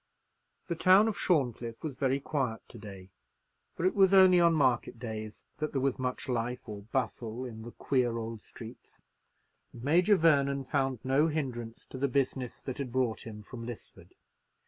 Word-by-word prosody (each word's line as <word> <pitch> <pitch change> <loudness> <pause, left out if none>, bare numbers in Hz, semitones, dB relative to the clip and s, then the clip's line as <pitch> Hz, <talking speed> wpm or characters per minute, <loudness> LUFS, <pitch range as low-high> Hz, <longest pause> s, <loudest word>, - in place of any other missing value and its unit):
The 175 - -1
town 190 +5 +5
of 220 - -1
Shorncliffe 120 - -1
was 150 -5 -4
very 135 0 +1
quiet 135 -6 -2
to 115 - -11
day, 95 -3 -11 0.6
for 170 - -2
it 185 - +3
was 195 -1 +5
only 185 -2 +7
on 170 -1 +5
market 130 -6 +1
days 110 -2 -7 0.2
that 155 0 -2
there 135 - +1
was 135 -1 0
much 125 +1 -3
life 125 0 -2
or 105 -1 -7
bustle 120 -1 -2
in 110 -3 -8
the 115 - -8
queer 125 -3 0
old 115 -1 -5
streets, 115 +3 -12 0.7
and 120 - -11
Major 175 +8 +4
Vernon 140 -5 +3
found 135 -3 -1
no 135 +4 +3
hindrance 125 -7 -4
to 130 - -9
the 140 - +2
business 130 -1 -2
that 130 0 -5
had 135 -3 -4
brought 120 -3 -1
him 105 -1 -8
from 115 +1 -9
Lisford. 120 -1 -10
130 Hz, 175 wpm, -30 LUFS, 115-145 Hz, 0.7 s, only